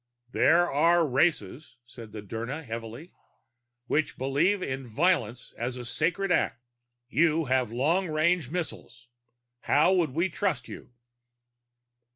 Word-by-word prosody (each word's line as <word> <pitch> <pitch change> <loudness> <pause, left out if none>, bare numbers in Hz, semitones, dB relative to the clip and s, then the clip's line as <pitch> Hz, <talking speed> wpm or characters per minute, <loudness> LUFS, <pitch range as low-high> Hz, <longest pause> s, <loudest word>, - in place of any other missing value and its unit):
"There 170 +6 +4
are 165 +3 +3
races," 135 - 0
said 115 -3 -12
the 105 -1 -8
Dirnan 115 +9 -5
heavily, 115 +7 -8 0.7
"which 145 +4 -1
believe 160 +10 +1
in 130 -1 -4
violence 125 - 0
as 125 +2 -3
a 125 - -7
sacred 170 +9 -1
act. 130 - +1 0.5
You 160 +3 +2
have 130 -3 0
long 160 +10 +1
range 155 -2 +1
missiles. 130 -7 -6 0.5
How 150 +8 +3
might 175 -5 +2
we 165 +8 0
trust 175 - -2
you?" - - -10
145 Hz, 125 wpm, -27 LUFS, 120-170 Hz, 0.7 s, There